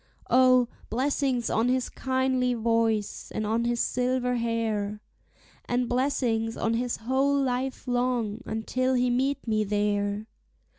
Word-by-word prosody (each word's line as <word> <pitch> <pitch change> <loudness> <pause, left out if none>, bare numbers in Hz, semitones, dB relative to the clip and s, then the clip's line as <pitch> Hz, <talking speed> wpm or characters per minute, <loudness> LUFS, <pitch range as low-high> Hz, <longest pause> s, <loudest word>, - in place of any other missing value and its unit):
O, 255 -1 +5 0.2
blessings 260 0 0
on 230 +3 +2
his 255 0 +1
kindly 260 -1 0
voice, 225 -2 0
and 215 - -1
on 225 +2 0
his 240 0 0
silver 250 0 0
hair, 220 -3 -1 0.7
And 245 0 0
blessings 240 -3 0
on 225 - 0
his 240 +1 -1
whole 270 +4 +1
life 260 0 -2
long, 245 -3 0
until 255 +4 -1
he 250 0 +2
meet 270 +2 0
me 215 -1 +2
there! 205 0 0
245 Hz, 130 wpm, -27 LUFS, 225-255 Hz, 0.7 s, O